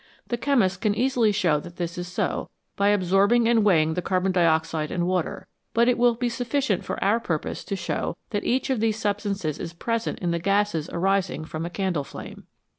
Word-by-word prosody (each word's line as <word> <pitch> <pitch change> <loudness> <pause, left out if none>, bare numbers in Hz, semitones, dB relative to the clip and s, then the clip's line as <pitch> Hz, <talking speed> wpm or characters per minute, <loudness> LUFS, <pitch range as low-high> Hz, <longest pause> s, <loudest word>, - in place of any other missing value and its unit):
The 240 - +1
chemist 225 -8 +1
can 210 -2 +1
easily 240 -2 +2
show 180 -7 +2
that 170 +3 -11
this 170 -1 -4
is 175 0 -5
so 180 - -2 0.3
by 200 - +2
absorbing 205 +4 +3
and 230 -2 +4
weighing 160 -6 +4
the 180 - -2
carbon 185 +1 0
dioxide 160 -3 +1
and 175 -1 -1
water, 180 -2 -2 0.3
but 235 +1 +4
it 250 - +4
will 240 -1 +3
be 245 +1 -1
sufficient 240 -3 -1
for - - -4
our 205 +4 +3
purpose 165 -9 -3
to 200 - -2
show 175 -1 -3
that 205 -2 -1
each 260 +2 0
of 255 - +1
these 220 -1 +1
substances 200 -6 -2
is 165 - -5
present 230 +6 -2
in 175 -2 -1
the 170 - 0
gases 195 -3 +1
arising 185 -3 0
from 160 +1 -4
a - - -5
candle 180 -5 -1
flame. - - -10
195 Hz, 200 wpm, -25 LUFS, 170-225 Hz, 0.3 s, and